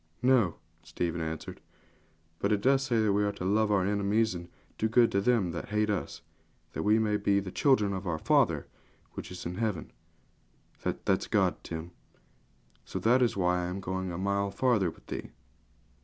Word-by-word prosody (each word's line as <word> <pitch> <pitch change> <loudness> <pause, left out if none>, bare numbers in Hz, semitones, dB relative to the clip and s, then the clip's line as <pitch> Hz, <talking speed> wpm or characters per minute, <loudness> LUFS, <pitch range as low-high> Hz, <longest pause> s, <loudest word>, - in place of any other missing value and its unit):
'No,' 125 -10 +4 0.3
Stephen 85 0 -3
answered; 80 0 -5 0.8
'but 100 - 0
it 105 -1 +1
says 130 -5 +3
we 100 +1 +2
are 100 - +1
to 90 - -6
love 105 +3 +2
our 95 -3 +3
enemies, 105 +2 +1
and 85 0 -8 0.3
do 110 - +1
good 120 +1 +4
to 100 - +1
them 105 -5 +2
that 85 - -6
hate 105 0 +1
us, 100 - -4 0.5
that - - -3
we 105 +1 +4
may 105 -1 +1
be 100 -1 +2
the 95 -2 -6
children 105 -7 +3
of 95 0 -4
our 85 -2 -1
Father - - +2 0.5
which - - -7
is 90 -1 -8
in 90 +2 -4
heaven 105 -8 -2 0.9
that - - -4
is - - +2
God, - - +1
Tim. 80 +1 -6 0.9
So - - -6
that 125 +3 +3
is 120 -5 +2
why 90 -1 +2
I 90 - -2
am 90 +2 -4
going 95 -1 -3
a 85 - -5
mile 100 +1 0
farther 105 -4 +2
with - - -15
thee.' - - -6
100 Hz, 185 wpm, -29 LUFS, 90-110 Hz, 0.9 s, No